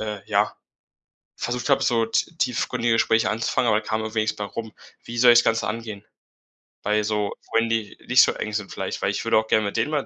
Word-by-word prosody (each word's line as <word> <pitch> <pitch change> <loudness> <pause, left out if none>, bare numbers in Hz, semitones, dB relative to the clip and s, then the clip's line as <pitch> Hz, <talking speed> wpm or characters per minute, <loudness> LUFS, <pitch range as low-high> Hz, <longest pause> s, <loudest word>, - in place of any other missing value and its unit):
äh, 105 -2 -5
ja, 105 0 +1 0.8
versucht 120 +3 -3
habe, 135 -1 +3
so 115 -2 +2
t 115 - -1
tiefgründige 120 -2 0
Gespräche 115 0 +2
anzufangen, 115 +3 0
aber 105 -1 +3
da - - -15
kam 110 0 -1
irgendwie 110 0 -1
nichts 110 - -1
bei 105 - -5
rum. 110 +1 -7 0.3
Wie 120 - -8
soll 120 0 +7
ich 120 - +7
das - - -1
Ganze 115 0 +1
angehen? 110 -2 -6 0.8
Bei 105 0 +1
so 105 -1 -1 0.2
Freunden, 115 0 +1
die 115 -3 -2
nicht - - +6
so - - +2
eng 105 - -5
sind 105 -2 -3
vielleicht, - - -5
weil - - +1
ich - - -3
würde - - +3
auch 110 0 +1
gerne 110 -1 +2
mit 100 - -3
denen 115 +7 0
mal 145 -3 -1
110 Hz, 235 wpm, -23 LUFS, 105-115 Hz, 0.8 s, soll